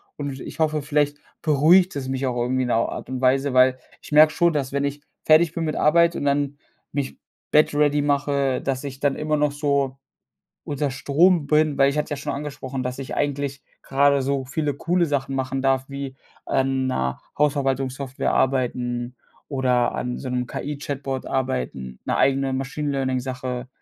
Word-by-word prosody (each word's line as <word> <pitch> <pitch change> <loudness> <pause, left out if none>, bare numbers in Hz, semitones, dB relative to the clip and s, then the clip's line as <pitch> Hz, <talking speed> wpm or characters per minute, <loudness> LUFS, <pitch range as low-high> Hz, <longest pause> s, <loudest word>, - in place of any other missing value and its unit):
und 145 -1 -4
w - - -8
ich - - -9
hoffe, 155 -1 +1
vielleicht 145 0 0 0.3
beruhigt 170 +5 +4
es 135 -2 -4
mich 135 0 -2
auch 125 -2 -1
irgendwie 130 +2 0
in 125 - -2
'ner 115 -1 +2
Art - - -7
und 130 -1 -4
Weise, 135 +1 +2
weil 130 0 +5 0.2
ich - - -13
merke 155 +1 +7
schon, 170 -1 +3
dass 140 -3 -2
wenn 140 0 -1
ich 140 +1 -4 0.2
fertig 160 +1 +5
bin 170 - -2
mit 155 - -2
Arbeit 170 +2 +4
und - - -3
dann 140 0 0 0.3
mich 140 -1 -3 0.3
Bett 150 0 +4
ready 145 0 +3
mache, 140 -2 +1
dass 135 -1 -2
ich 135 -1 -7
dann 140 -1 +2
immer 155 0 -1
noch 150 0 +2
so 140 -2 0 0.7
unter 145 -1 -2
Strom 145 +5 +3
bin, 150 0 +2
weil 135 0 +5
ich 145 - -3
hatte 150 - -1
ja 145 - -2
schon 145 +1 -4
angesprochen, 135 -2 -5
dass 125 +1 -4
ich 135 - -5
eigentlich 140 -1 -2 0.2
grade 140 0 +3
so 135 0 -1
viele 145 +1 -1
coole 170 +5 +1
Sachen 140 -2 -1
machen 135 0 -2
darf 135 -1 +2
wie 140 -1 -6 0.3
an 135 0 +1
'ner 65 - -1 0.2
Hausverwaltungssoftware 135 -2 0
arbeiten 125 -2 0 0.3
oder 125 -3 +1
an 125 0 -3
so 130 - -6
'nem 125 0 -1
KI-Chatbot 140 -1 -4
arbeiten, 65 - -3
'ne - - 0
eigene 135 0 +2
Machine 135 +3 -2
Learning 130 -2 0
Sache, 125 -1 -5
140 Hz, 185 wpm, -23 LUFS, 130-145 Hz, 0.7 s, merke